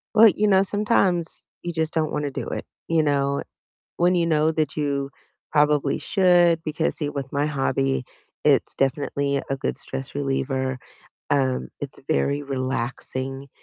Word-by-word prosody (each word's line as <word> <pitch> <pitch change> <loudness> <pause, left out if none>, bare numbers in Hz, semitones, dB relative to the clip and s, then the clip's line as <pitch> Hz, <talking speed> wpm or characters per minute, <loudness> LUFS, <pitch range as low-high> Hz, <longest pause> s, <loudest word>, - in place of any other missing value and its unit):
Well, 225 +1 +9
you 210 0 +2
know, 190 -1 +5
sometimes 195 -5 +1 0.2
you 175 - -3
just 160 -1 -1
don't 155 -2 0
want 150 0 -1
to 140 - -3
do - - -4
it, - - -4 0.2
you 165 -1 +3
know, 140 -1 +1 0.5
when 175 +1 +3
you 170 -1 +2
know 155 -1 +3
that 155 -2 -1
you 140 -2 -1 0.4
probably 150 -2 +3
should 175 -4 +4
because, 155 +1 -1
see, 150 - -2
with 135 -2 -5
my 145 +1 +1
hobby, 135 -2 0 0.4
it's - - +3
definitely 140 0 0
a 135 - +1
good 135 - -2
stress 135 -1 -6
reliever, 135 -2 -1 0.5
um, 130 - +1
it's - - -6
very 140 - +1
relaxing, 130 0 -3
145 Hz, 155 wpm, -24 LUFS, 135-160 Hz, 0.5 s, Well